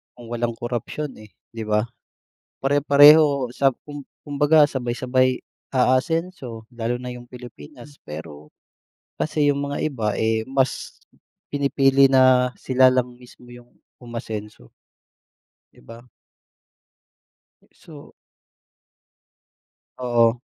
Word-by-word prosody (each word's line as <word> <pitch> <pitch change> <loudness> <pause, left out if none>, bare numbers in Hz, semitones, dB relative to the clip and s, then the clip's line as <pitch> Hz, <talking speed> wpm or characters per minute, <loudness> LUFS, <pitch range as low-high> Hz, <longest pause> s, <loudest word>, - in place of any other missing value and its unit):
kung 120 -2 -13
walang 120 -1 -2
korapsyon, 120 +5 -5
eh, 110 - -13 0.2
di 115 -1 -7
ba? 105 +1 +1 0.8
Pare-pareho 145 -1 +5
sa 135 +1 +1
kum 145 -1 -8 0.2
kumbaga 145 +1 +3
sabay-sabay 130 0 -1 0.3
aasenso 130 -2 -1
lalo 120 0 -4
na 125 - -6
yung 125 0 -9
Pilipinas. 125 - -13
Pero 75 -1 -10 0.6
kasi 150 -1 -1
yung 140 - -3
mga - - -3
iba, 115 -8 -3
eh, 110 0 0
mas 135 -1 -2 0.5
pinipili 140 -1 +3
na 130 -1 +4
sila 130 0 +3
lang 125 -1 -1
mismo 125 0 -18
yung 120 0 -16 0.3
umasenso. 110 - -8 1.0
Di - - -24
ba? 115 +1 -13 1.7
So 150 -3 -15 1.9
Oo. 120 -1 +2
125 Hz, 100 wpm, -22 LUFS, 120-140 Hz, 1.9 s, Pare-pareho